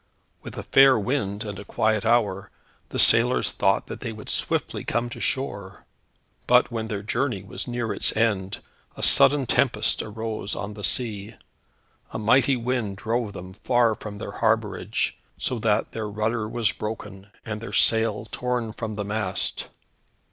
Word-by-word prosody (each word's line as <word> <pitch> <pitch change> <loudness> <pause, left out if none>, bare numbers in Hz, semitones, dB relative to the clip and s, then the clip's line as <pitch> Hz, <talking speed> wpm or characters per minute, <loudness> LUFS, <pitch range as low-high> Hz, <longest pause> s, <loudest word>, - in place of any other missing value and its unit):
With - - -10
a - - -4
fair 135 -2 +6
wind, 105 -2 -2
and 105 -2 -6
a - - -7
quiet 110 +1 0
hour, 105 -5 +1 0.4
the - - -5
sailors - - +4
thought - - +1
that - - -8
they 115 - -5
would 110 -1 -10
swiftly - - -1
come 120 +1 -2
to - - -7
shore. 100 -8 -3 0.6
But - - +4
when 110 -1 -3
their 105 -2 -4
journey 105 -2 -1
was 100 - -5
near 120 -3 -2
its - - 0
end, 100 -4 0 0.3
a - - -4
sudden 140 -1 +6
tempest 115 -3 +2
arose 110 -1 -4
on 105 +1 -5
the 105 0 -9
sea. 110 -3 +1 0.7
A - - -5
mighty 130 +5 +3
wind 120 -5 -2
drove 115 0 -2
them 95 -1 -9
far 120 +2 +2
from 105 -1 -8
their 100 - -6
harbourage, 110 0 -1 0.2
so 125 - -1
that 105 -1 +1
their 110 -2 -4
rudder 110 +1 -2
was 115 -3 +1
broken, 105 -2 -7 0.2
and 110 -1 -5
their 115 - -7
sail 110 -2 +3
torn 125 -3 -2
from 110 -1 -5
the 105 0 -4
mast. 100 -2 -2
110 Hz, 160 wpm, -24 LUFS, 105-120 Hz, 0.7 s, fair